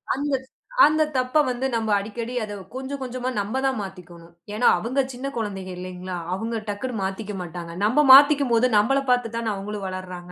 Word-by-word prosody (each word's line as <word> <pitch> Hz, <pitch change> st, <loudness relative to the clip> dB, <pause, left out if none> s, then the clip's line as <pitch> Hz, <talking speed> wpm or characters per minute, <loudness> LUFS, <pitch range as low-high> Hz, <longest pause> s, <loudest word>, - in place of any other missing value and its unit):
அந்த 285 Hz, +1 st, -2 dB, 0.5 s
அந்தத் 305 Hz, 0 st, +2 dB
தப்ப 255 Hz, +1 st, -1 dB
வந்து 250 Hz, +1 st, -2 dB
நம்ம 225 Hz, -1 st, -1 dB
அடிக்கடி 225 Hz, +4 st, -5 dB
அத 210 Hz, -1 st, -6 dB, 0.2 s
கொஞ்சம் 270 Hz, +1 st, -5 dB
கொஞ்சமா 255 Hz, 0 st, -3 dB
நம்ம 210 Hz, +6 st, -2 dB
தான் 265 Hz, -2 st, +1 dB
மாத்திக்கோணும். 175 Hz, -3 st, -10 dB, 0.2 s
ஏன்னா, 225 Hz, +4 st, +2 dB
அவங்க 255 Hz, +5 st, -2 dB
சின்னக் 275 Hz, +3 st, -6 dB
குழந்தைங்க 195 Hz, -4 st, -4 dB
இல்லைங்களா, 180 Hz, 0 st, -6 dB, 0.2 s
அவங்க 225 Hz, +3 st, -3 dB
டக்குன்னு 210 Hz, +1 st, -3 dB
மாத்திக்க 195 Hz, +2 st, -4 dB
மாட்டாங்க. 170 Hz, -1 st, -7 dB
நம்ம 260 Hz, +8 st, +3 dB
மாத்திக்கும்போது 270 Hz, -4 st, +6 dB
நம்மள 270 Hz, +7 st, +3 dB
பார்த்துத் 240 Hz, -2 st, 0 dB
தான 230 Hz, -2 st, -1 dB
அவங்களும் 200 Hz, 0 st, -5 dB
வளர்றாங்க. 185 Hz, -1 st, -7 dB
225 Hz, 165 wpm, -24 LUFS, 190-255 Hz, 0.5 s, மாத்திக்கும்போது